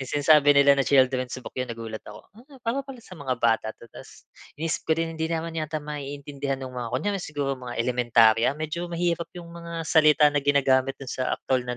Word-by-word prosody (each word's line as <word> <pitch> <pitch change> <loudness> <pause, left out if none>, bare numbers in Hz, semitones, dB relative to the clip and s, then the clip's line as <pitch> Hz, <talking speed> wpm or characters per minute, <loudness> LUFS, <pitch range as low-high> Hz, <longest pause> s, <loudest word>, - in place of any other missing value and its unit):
no'ng 130 - -6
sinasabi 145 0 +5
nila 140 0 +7
na 135 - +4
children's 130 -2 +2
book 125 - -10
'yon, 125 -1 -3
nagulat 115 -1 -7
ako. 105 - -12
"Hmm, 265 +6 -17
para 235 +4 0
pala 270 -2 -10
sa 185 - -12
mga 140 -5 -3
bata 115 -2 +1
'to", - - -14
tas - - -13 0.3
iniisip 160 +1 -2
ko 160 - +3
din, 165 0 -2
hindi 160 0 -2
naman 165 0 -3
yata 155 -1 -3
maiintindihan 140 -2 -5
no'ng 130 -1 -7
mga 120 -2 -4
kunyari 200 +8 -1
siguro 145 -4 -2
mga 125 -2 -8
elementarya, 115 -2 +3
medyo 155 +3 -4
mahirap 170 0 -1
yung 170 -1 -9
mga 170 -1 -6
salita 155 -1 +5
na 145 - +1
ginagamit 135 -1 +2
do'n 135 -2 -8
sa 130 -1 -1
aktuwal 130 -1 -1
na 125 - -2
145 Hz, 210 wpm, -25 LUFS, 130-165 Hz, 0.3 s, nila